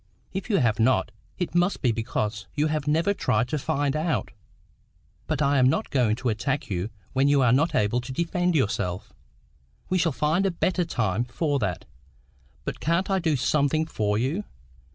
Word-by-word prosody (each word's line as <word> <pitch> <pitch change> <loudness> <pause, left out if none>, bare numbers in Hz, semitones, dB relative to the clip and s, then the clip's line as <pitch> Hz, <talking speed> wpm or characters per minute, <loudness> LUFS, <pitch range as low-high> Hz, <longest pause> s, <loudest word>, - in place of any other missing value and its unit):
"If 195 +4 -4
you 205 - +3
have 115 - +2
not, 115 -1 +2 0.3
it 180 -3 -3
must 175 +1 +1
be 125 - +4
because 110 -1 -3
you 150 0 +2
have 155 -2 -1
never 165 +7 +2
tried 115 - +1
to 150 - -1
find 145 -1 0
out. 155 +1 -1 1.0
But 155 -2 0
I'm 140 -2 +4
not - - -1
going 120 -6 +2
to 125 +1 -2
attack 135 +4 -2
you 90 +3 -2 0.2
when 135 +1 +3
you 145 -2 +4
are 120 - +4
not 145 +7 +2
able 105 +4 +2
to 125 +2 -8
defend 175 +4 0
yourself. 105 - -1 0.8
We 185 - +2
shall 165 -1 +2
find 155 +8 +1
a - - +2
better 180 0 0
time 110 - 0
for 140 +4 -1
that. 95 -7 -2 0.8
But - - -4
can't 170 +5 0
I 190 - +2
do 160 -4 +1
something 145 +3 +1
for 105 -8 -1
you? 140 - -1
140 Hz, 180 wpm, -25 LUFS, 115-165 Hz, 1.0 s, be